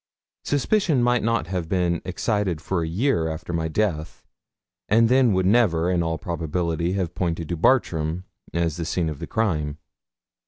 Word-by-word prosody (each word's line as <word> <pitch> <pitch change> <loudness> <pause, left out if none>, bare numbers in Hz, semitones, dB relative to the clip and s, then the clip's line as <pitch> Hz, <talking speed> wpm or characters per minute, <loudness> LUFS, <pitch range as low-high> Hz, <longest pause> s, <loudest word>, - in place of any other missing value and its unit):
Suspicion 145 - +2
might 120 0 +3
not 115 -6 0
have 90 -2 -3
been 90 -2 +1
excited 95 -2 -1
for 85 +1 -2
a 80 - -2
year 90 -1 +1
after 80 +2 -5
my 80 -1 0
death, 80 -2 -2 0.7
and 115 +2 +4
then 130 -2 +4
would 95 0 +1
never, 90 -5 +3
in 90 -1 +1
all 80 -1 -1
probability, 85 +1 -2
have 90 -4 -2
pointed 85 -3 -2
to 85 - -1
Bartram 85 -5 +1 0.3
as 85 -2 -1
the 85 - -3
scene 85 0 -1
of 75 - -6
the - - -6
crime. 75 -10 -1
90 Hz, 165 wpm, -24 LUFS, 80-105 Hz, 0.7 s, and